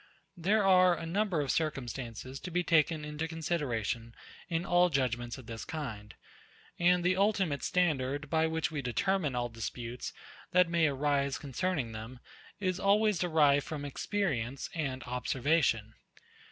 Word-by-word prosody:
There 200 +4 +2
are 185 -2 +6
a 165 - -5
number 185 -1 0
of 140 - 0
circumstances 130 -4 -3
to - - -7
be 180 +1 0
taken 155 -2 +2
into 150 +2 -3
consideration 130 -9 -2 0.3
in 165 0 -1
all 175 0 +4
judgements 120 -4 -1
of 130 - -11
this 115 -1 -6
kind; 110 -10 -6 0.6
and 175 0 +4
the 180 +1 +3
ultimate 195 -7 +1
standard, 145 -5 0
by 160 +2 +2
which 160 -1 -1
we 150 -3 -2
determine 140 - 0
all 120 0 0
disputes, 115 +1 -5 0.4
that 180 -1 +5
may 170 -1 +3
arise 140 -1 0
concerning 145 -2 -2
them, 110 +3 -8 0.4
is 185 -3 -1
always 205 -1 +3
derived 150 -5 +4
from 150 -2 -4
experience 140 - -2
and 135 -5 -3
observation. 125 -2 +1
150 Hz, 140 wpm, -31 LUFS, 125-175 Hz, 0.6 s, are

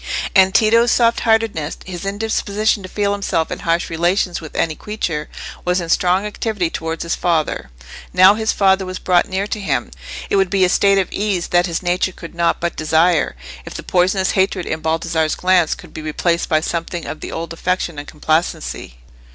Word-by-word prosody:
And 190 -1 +5
Tito's 230 +2 +4
soft 235 -1 +3
heartedness, 220 -9 0
his 180 -1 -7
indisposition 210 0 0
to 185 - -9
feel 205 0 0
himself 195 -5 -1
in - - -4
harsh 170 +1 0
relations 175 +2 0
with 160 - -10
any 160 - 0
creature, 160 -6 -4 0.3
was 180 +1 +1
in 170 -2 -5
strong 180 +4 +2
activity 210 -4 -2
towards 160 0 -4
his 170 - -2
father, 160 - -1 0.4
now 185 +2 +7
his 220 +1 0
father 190 -1 +3
was 185 0 -5
brought 180 -1 +2
near 190 +1 -2
to 210 - -4
him. 200 - -2 0.4
It - - +1
would 195 -2 +2
be 190 0 +3
a - - +1
state 200 +1 +3
of 190 - 0
ease 200 -4 -1
that 175 +1 +3
his 170 +1 -3
nature 180 +1 0
could 165 - -10
not 170 0 +1
but 170 0 -2
desire, 160 - +2 0.3
if - - -9
the - - -6
poisonous 185 +1 +1
hatred 190 -2 +1
in 160 - -3
Baldassarre's 160 0 0
glance 180 -3 +2
could - - -14
be 160 - -6
replaced 170 +2 -1
by 155 -1 +3
something 170 +1 -3
of 155 - -6
the - - -7
old 165 0 -5
affection 175 -2 -2
and 145 - -8
complacency. 155 - -2
180 Hz, 190 wpm, -19 LUFS, 165-195 Hz, 0.4 s, now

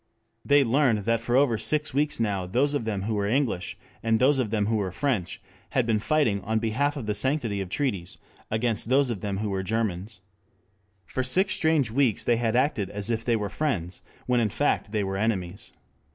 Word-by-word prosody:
They 145 0 +5
learned 120 -5 +2
that 115 0 +2
for 120 +1 -1
over 130 -5 +3
six 150 -2 -1
weeks 145 0 0
now 100 -5 -1
those 135 +9 +1
of 145 -6 -1
them 100 -3 -2
who 110 +2 -2
were 100 -1 0
English 120 -6 -1 0.2
and 115 -1 +2
those 135 +3 +3
of 120 -5 0
them 105 -1 0
who 110 +1 +1
were 95 -3 -2
French 115 -4 -2 0.4
had 125 - +3
been 110 -2 +1
fighting 115 -6 +1
in 110 +1 0
behalf 130 +7 0
of 130 - -5
the 105 - 0
sanctity 115 -2 0
of 95 - -5
treaties 100 -8 -2 0.3
against 110 0 -1
those 135 -1 +3
of 100 -6 -5
them 100 -2 -2
who 105 0 -2
were 95 -1 -1
Germans. 105 -1 -3 0.8
For 130 - -3
six 185 +11 +3
strange 155 -8 +2
weeks 125 -3 +1
they 120 - +3
had 115 -1 0
acted 125 -7 +1
as 105 +2 -2
if 115 0 -1
they 120 0 +1
were 105 -2 -1
friends, 100 - -2 0.2
when 125 -1 +2
in 110 -2 +1
fact 125 -3 0
they 105 -2 0
were 95 0 -3
enemies. 100 -1 -2
115 Hz, 210 wpm, -26 LUFS, 100-130 Hz, 0.8 s, They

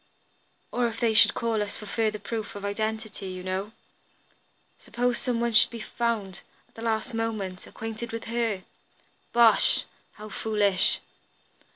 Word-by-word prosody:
"Or 245 -1 +1
if 225 -1 -5
they 230 -2 +2
should 220 - +7
call 225 -2 0
for 210 - -7
further 215 0 0
proof 215 +1 -5
of 200 0 -6
identity, 215 -1 -3
you 185 -1 -6
know. 190 +3 -3 1.1
Suppose 245 0 -1
some 245 -2 -1
one 235 0 +1
should 220 - +6
be 235 - -7
found, 220 -4 -2 0.3
at - - -33
the 225 - -10
last 225 0 -1
moment, 215 -5 -3
acquainted 225 +1 -6
with 230 0 -4
her!" 230 -4 -1 0.7
"Bosh! 235 -1 +6 0.3
How 215 0 -10
foolish!" 205 -3 +2
220 Hz, 145 wpm, -27 LUFS, 205-230 Hz, 1.1 s, should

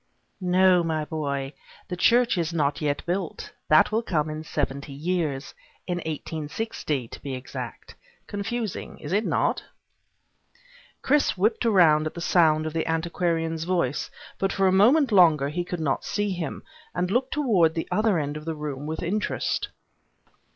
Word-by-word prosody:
"No, 185 0 +4
my 160 -2 -1
boy. 140 -3 -3 0.3
The 180 - -4
church 240 +7 +4
is 170 -2 -1
not 150 -3 0
yet 145 -1 -1
built. 175 0 -3 0.2
That 155 +5 +6
will 220 +2 +1
come 155 -8 -1
in 155 +1 -5
seventy 140 -2 -3
years. 150 -2 -2 0.3
In 175 -1 -2
eighteen 155 -1 -4
sixty, 150 - -3
to - - -11
be 135 -2 -4
exact. 125 -2 -8 0.3
Confusing, 215 +1 -4
is 150 +4 -6
it 210 +2 +2
not?" - - +1 1.4
Chris 290 -6 +2
whipped 220 +5 +1
about 165 -8 +5
at - - -7
the - - -5
sound 160 -3 +3
of 155 - -3
the 165 -1 -1
antiquarian's 165 -1 -1
voice 170 -7 0 0.3
but 195 - +1
for 195 - +1
a - - +4
moment 240 +8 +5
longer 160 -8 +5
he 175 +4 -2
could 175 0 -5
not 145 -4 -1
see 205 -1 -1
him, 175 -5 -4 0.3
and 180 +1 -1
looked 255 +6 0
toward 195 - +3
the 165 - -2
other 215 -3 +2
end 145 -1 -2
of 150 - -9
the 165 -1 -3
room 150 -1 -5
with 160 +2 -4
interest. 205 +5 -1
165 Hz, 165 wpm, -25 LUFS, 150-190 Hz, 1.4 s, That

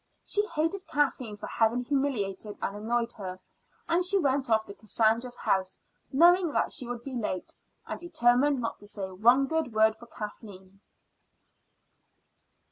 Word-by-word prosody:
She 415 - +1
hated 330 +5 -2
Kathleen 260 -7 -1
for - - -7
having 230 +2 +1
humiliated 225 -7 -2
and 200 - -3
annoyed 230 +2 -1
her; 185 -3 -6 0.5
and 340 +2 +2
she 380 +2 +5
went 275 -6 +1
off 220 -1 +3
to 200 - -9
Cassandra's 225 +4 0
house 190 0 0 0.3
knowing 345 +3 +5
that - - +1
she 255 -5 0
would 240 -1 -5
be 275 - -7
late, 215 -6 -3 0.3
and - - -5
determined 285 -4 +2
not 230 -2 -3
to 205 - -10
say 195 -2 -4
one 240 +8 +4
good 320 -4 -2
word 220 0 +4
for 235 +2 -14
Kathleen. 195 -3 -10
240 Hz, 150 wpm, -28 LUFS, 210-280 Hz, 0.5 s, she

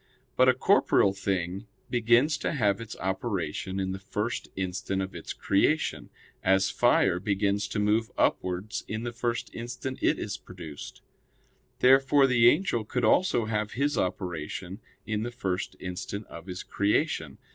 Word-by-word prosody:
But - - +5
a - - +4
corporeal 95 - +3
thing 95 0 -2 0.2
begins 120 +5 +4
to - - -1
have 105 -6 +1
its 115 -1 -7
operation 95 -2 -2
in 95 -1 -1
the 95 - -5
first 105 +4 -3
instant 95 +1 -2
of 95 0 -3
its - - -7
creation; 150 +11 +1 0.3
as 95 0 +3
fire 95 -4 +3
begins 100 +1 0
to 105 - -4
move 105 +2 +2
upwards 90 +4 0
in 110 +1 -4
the 120 - -3
first 120 0 -3
instant 125 +2 -5
it - - +3
is 100 -2 -4
produced. 85 -7 -10 0.8
Therefore 135 +2 +6
the 120 -2 +6
angel 145 - +1
could 120 +3 -1
also 120 -2 +3
have 105 -1 -2
his 145 +3 0
operation 90 +1 -3 0.3
in 110 -1 -2
the 120 - -2
first 95 -5 -3
instant 95 +3 -5
of 85 +2 -11
his 90 -1 -6
creation. 100 - 0
105 Hz, 150 wpm, -28 LUFS, 95-120 Hz, 0.8 s, Therefore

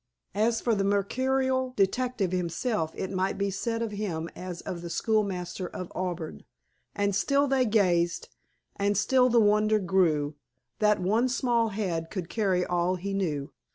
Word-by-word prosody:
As 225 +3 +1
for 235 - +1
the 200 -2 +1
mercurial 260 +6 +1
detective 205 0 +1
himself, 180 0 -1
it 190 - -4
might 185 +1 -1
be 200 0 0
said 230 +4 -2
of 225 - -3
him 175 -6 -3
as 180 -1 -6
of 175 -2 -5
the 170 - -6
school 220 +5 +2
master 180 -1 -4
of 180 0 -7
Auburn: 175 -3 -4 0.5
_And 200 0 +1
still 280 +8 +2
they 265 -2 +2
gazed, 175 -5 +2 0.5
and 200 0 +1
still 255 +4 +4
the 235 -1 +4
wonder 215 0 +4
grew, 170 -6 +1 0.5
That 210 -1 +3
one 220 +8 +2
small 240 -2 +1
head 180 -6 -2
could 185 -4 -5
carry 190 -5 +1
all 175 +1 +1
he 195 +2 -4
knew. 150 -8 -2
200 Hz, 160 wpm, -28 LUFS, 180-225 Hz, 0.5 s, still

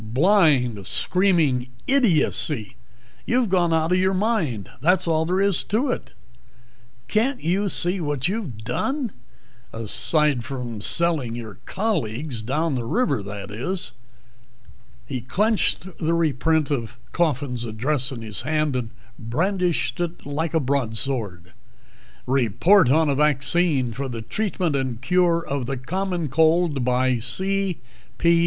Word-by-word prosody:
"Blind, 130 - +2
screaming 155 - +2 0.2
idiocy. 165 - +1 0.5
You've 245 -3 +2
gone 175 -2 +2
out 160 +1 +1
of 180 - +3
your 190 +1 +2
mind 185 - 0
that's 180 +4 +2
all 160 -1 +1
there 185 +2 +1
is 200 -2 +2
to 245 +6 0
it. - - -6 0.9
Can't 245 +5 0
you 190 +5 +1
see 180 +1 0
what 145 -3 -1
you've 190 - -3
done? 255 - -2 0.6
Aside 130 +4 +2
from 125 -5 -5
selling 150 -4 0
your 110 -5 -8
colleagues 145 - -2
down 150 +7 -1
the 125 -2 -2
river, 230 - 0
that 100 0 -7
is?" 175 - -3 1.1
He 130 - -4
clenched 205 - 0
the 165 +1 +1
reprint 160 -1 +1
of 120 -5 -3
Coffin's 140 -7 -1
address 125 +5 -1
in 120 -4 -7
his 105 -3 -3
hand 155 -2 0
and 120 -3 -2 0.3
brandished 175 - -1
it 175 0 -4
like 150 +3 -2
a - - +4
broadsword. 115 - -1 0.7
"'Report 135 - +4
on 155 +3 +4
a 140 - +2
Vaccine 145 -2 +1
for 135 +3 -4
the 115 -2 -5
Treatment 180 - -1
and 130 -4 -2
Cure 170 +5 +2
of 135 -3 -2
the 135 0 -2
Common 175 +5 -2
Cold,' 160 0 +2
by 125 0 +1
C. 190 - -1 0.4
P. 170 - +3
150 Hz, 135 wpm, -23 LUFS, 125-180 Hz, 1.1 s, a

